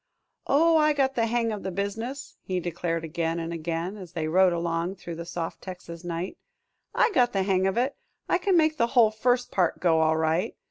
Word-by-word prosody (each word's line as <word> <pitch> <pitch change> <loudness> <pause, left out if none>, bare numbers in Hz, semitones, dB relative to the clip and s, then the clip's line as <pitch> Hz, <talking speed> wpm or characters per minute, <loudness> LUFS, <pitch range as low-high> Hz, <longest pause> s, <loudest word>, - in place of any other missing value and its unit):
"Oh, 325 +4 +4
I 305 -1 +4
got 270 -2 +1
the 230 -3 +1
hang 230 0 0
of 210 -2 -4
the 190 - -3
business," 220 +8 -4
he 185 -1 -2
declared 170 -1 -3
again 165 +1 -2
and 165 0 -4
again, 170 +4 -3
as 180 -3 -10
they 160 -3 -2
rode 185 +3 +4
along 170 +2 -1
through 175 -2 -8
the 170 +1 -7
soft 170 -1 -5
Texas 180 -2 -9
night; 175 +1 -4 0.6
"I 455 - +3
got 245 -8 +3
the 195 -1 +1
hang 190 -1 +2
of 195 - -1
it. 255 +3 +1 0.3
I - - +2
can 370 0 +2
make 310 -1 +3
the 235 - +2
whole 225 -3 +7
first 245 +3 0
part 180 -3 +1
go 165 -3 +3
all 160 0 +3
right. 160 +2 0
185 Hz, 215 wpm, -26 LUFS, 170-240 Hz, 0.6 s, whole